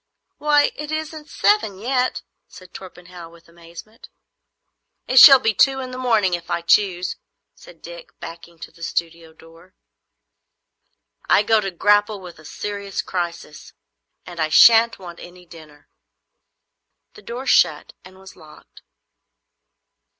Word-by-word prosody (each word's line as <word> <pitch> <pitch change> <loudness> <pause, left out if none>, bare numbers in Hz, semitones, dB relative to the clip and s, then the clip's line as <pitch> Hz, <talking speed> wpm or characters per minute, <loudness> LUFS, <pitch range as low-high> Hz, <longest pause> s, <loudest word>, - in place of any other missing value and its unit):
"Why, 295 -1 +2
it 300 0 -8
isn't 310 0 -6
seven 410 - 0
yet!" 250 +4 -2 0.2
said 185 -1 -17
Torpenhow, 180 -2 -13
with 170 0 -21
amazement. 170 +6 -15 1.0
"It 260 - +4
shall 275 +1 +10
be 225 -4 -1
two 270 +5 +2
in 255 -1 -7
the 255 - -8
morning, 220 -7 0
if 170 -1 -5
I 170 - -2
choose," 185 0 0 0.4
said - - -19
Dick, - - -12
backing 170 0 -12
to - - -10
the 170 - -22
studio 165 0 -5
door. 165 +3 -20 1.5
"I - - +4
go 220 0 +2
to 195 - -4
grapple 205 +3 0
with 180 -4 -13
a 155 - -17
serious 200 +3 -6
crisis, 170 -4 -7 0.5
and 175 -2 -11
I 155 -1 -1
shan't 230 +9 +5
want 175 -3 -12
any 180 0 -14
dinner." 155 -4 -17 1.3
The 420 - -16
door 250 - -8
shut - - +1
and 185 +1 -17
was 190 0 -16
locked. 155 -1 -19
190 Hz, 135 wpm, -20 LUFS, 170-245 Hz, 1.5 s, shall